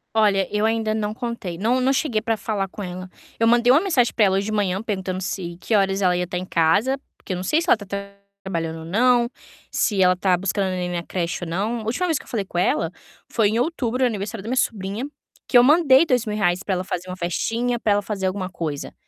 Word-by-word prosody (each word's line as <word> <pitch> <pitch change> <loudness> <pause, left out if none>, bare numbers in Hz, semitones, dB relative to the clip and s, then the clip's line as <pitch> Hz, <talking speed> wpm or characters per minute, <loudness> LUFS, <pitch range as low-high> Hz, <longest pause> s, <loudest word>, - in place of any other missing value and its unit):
Olha, 200 -3 +3
eu 210 - +1
ainda 225 -1 0
não 210 -1 -1
contei. 235 -7 -5
Não 235 +7 +1
não 260 +1 +3
cheguei 265 -5 0
para 225 0 -1
falar 200 -1 -2
com 205 +2 -8
ela. 185 0 -6 0.3
Eu 230 - +3
mandei 240 +1 +5
uma 305 - +5
mensagem 280 -12 +2
para 215 - +4
ela 190 -1 +2
hoje 195 - -1
de 215 - -3
manhã 200 -3 0
perguntando 190 -4 -3
se 175 -1 -4
que 225 - -3
horas 195 -1 +2
ela 180 -1 +3
ia 180 0 -1
tá 180 - -3
em 180 - -4
casa, 200 +12 +2 0.2
porque 190 - -6
eu - - -3
não 180 - -4
sei 300 - +2
se 340 - -5
ela - - +7
tá 205 - -10 0.6
trabalhando 165 -3 -3
ou - - -9
não, 240 +6 +3 0.4
se 200 -5 +2
ela 180 0 +4
tá 185 0 +2
buscando 195 +2 -1
a - - -1
neném 180 -1 -2
na 175 -1 -3
creche 170 0 -3
ou - - -7
não. 205 +8 -1
A - - -7
última 245 +11 -1
vez 325 -5 0
que - - -14
eu - - -22
falei 210 -5 -2
com 175 - -3
ela 165 -2 +1 0.4
foi 220 -2 +3
em 220 +2 0
outubro, 255 -4 -1
no - - +6
aniversário 210 -1 -4
da - - -9
minha 255 - 0
sobrinha, 210 -2 -1 0.4
que 250 - +5
eu 240 - +8
mandei 295 0 +6
2.000 235 -7 0
reais 180 -3 +1
para 195 -1 -1
ela 180 - -2
fazer 180 0 -5
uma 185 - -6
festinha, 230 +7 -1
para 210 - +2
ela 205 - +2
fazer 195 -2 -2
alguma 185 0 -3
coisa, 155 -5 -4
205 Hz, 255 wpm, -22 LUFS, 185-235 Hz, 0.6 s, eu